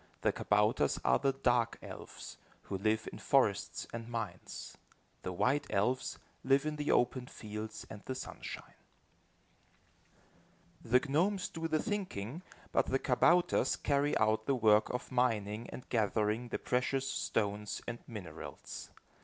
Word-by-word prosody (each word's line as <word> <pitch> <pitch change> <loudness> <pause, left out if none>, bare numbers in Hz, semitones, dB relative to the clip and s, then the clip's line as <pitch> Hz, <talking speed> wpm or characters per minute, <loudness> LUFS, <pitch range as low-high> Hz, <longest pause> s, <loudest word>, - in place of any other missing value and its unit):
The - - +3
kabouters 105 -7 +2
are 65 - +5
the 135 - +3
dark 120 -3 +2
elves, - - -9 0.3
who 95 - -3
live 110 +2 +1
in - - -8
forests 105 -7 +2
and 115 0 -5
mines. 115 -3 -5 0.5
The 95 - -3
white 125 +11 +1
elves 125 +6 +1 0.3
live 135 +2 +4
in 155 0 -2
the 150 0 -2
open 125 +1 +2
fields 110 -1 -6
and 105 - -9
the 130 - -2
sunshine. 130 - -7 2.1
The 125 +4 +3
gnomes 180 +6 +2
do 165 0 -3
the 155 -1 +2
thinking, 180 - -3 0.3
but - - +2
the 135 - +2
kabouters 170 +7 +3
carry 145 0 +1
out 110 0 +2
the 140 - +3
work 110 -3 +5
of 125 +2 -4
mining 115 -3 +1
and 125 - -8
gathering 110 +1 +1
the - - -2
precious 130 +2 0
stones 105 -1 -1
and 120 - -4
minerals. 105 -7 -8
120 Hz, 135 wpm, -34 LUFS, 105-135 Hz, 2.1 s, are